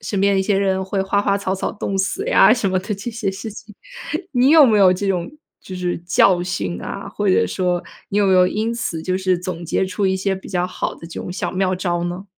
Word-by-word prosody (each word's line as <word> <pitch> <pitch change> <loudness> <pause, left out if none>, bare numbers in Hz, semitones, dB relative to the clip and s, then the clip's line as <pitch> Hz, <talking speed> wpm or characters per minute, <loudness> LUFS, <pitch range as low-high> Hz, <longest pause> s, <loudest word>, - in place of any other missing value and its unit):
身 200 - -3
边 200 -1 +3
一 - - +2
些 200 +1 +1
人 190 -1 +1
会 190 +1 -2
花 200 +1 +1
花 200 -1 +1
草 195 -1 -2
草 190 - -3
冻 195 -2 -4
死 200 - -1
呀， - - +6
什 220 -6 -1
么 185 - +1
的 205 +3 -4
这 200 +5 -6
些 220 -3 -2
事 195 +4 -7
情。 210 0 -12 0.6
你 250 0 +3
有 310 0 +8
没 220 -5 +4
有 190 -2 +6
这 185 +2 -1
种 180 -3 -1 0.3
就 185 - -8
是 180 -1 -2
教 175 0 +4
训 100 - -3
啊， - - -6
或 - - -2
者 95 0 +3
说 180 - -1 0.2
你 200 - -3
有 205 -1 +3
没 190 - +3
有 180 -1 +5
因 220 +4 -1
此 205 -9 -3
就 185 +2 -1
是 185 -1 +1
总 175 -1 -5
结 170 - 0
出 190 +2 -1
一 190 0 +1
些 190 +1 -1
比 190 - -10
较 180 -1 -1
好 180 - -4
的 165 - -11
这 165 - -7
种 - - -6
小 180 - -3
妙 185 0 0
招 175 -2 -2
呢？ 175 +2 -5
190 Hz, 275 characters per minute, -20 LUFS, 180-200 Hz, 0.6 s, 有